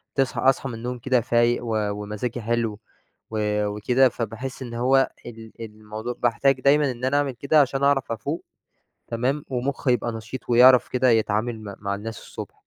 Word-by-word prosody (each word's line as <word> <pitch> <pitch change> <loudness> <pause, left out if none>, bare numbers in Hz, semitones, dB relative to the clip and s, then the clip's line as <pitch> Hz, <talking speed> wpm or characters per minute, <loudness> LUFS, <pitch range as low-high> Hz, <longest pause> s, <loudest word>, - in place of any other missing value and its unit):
تصحَى 135 -3 0
أصحَى 135 0 0
من 120 - -6
النوم 125 +2 -5
كده 125 0 +2
فايق 120 0 +2
و 115 - -1 0.2
ومزاجي 105 +4 -4
حلو 115 -2 -1 0.5
و 105 -1 0
وكده، 125 +6 +2
فباحس 120 +4 -5
إن 120 -2 -6
هو 130 +3 +3 0.2
ال 115 -2 -10
الموضوع 110 +1 -7
باحتاج 130 +3 +2
دايمًا 140 +1 +4
إن 125 +1 -5
أنا 140 +2 +2
أعمل 145 -2 +1
كده 140 +5 +3
عشان 135 0 0
أعرَف 140 -3 +2
أفوق. 140 +9 -4 0.6
تمام، 130 +5 -1
ومخي 130 0 -1
يبقى 120 -1 -1
نشيط 115 +3 -7
ويعرَف 125 +1 +7
كده 125 0 +2
يتعامل 110 +1 +1
م 100 -1 -7
مع 100 0 -2
الناس 110 +3 -6
الصبح. - - -9
120 Hz, 170 wpm, -24 LUFS, 110-130 Hz, 0.6 s, ويعرَف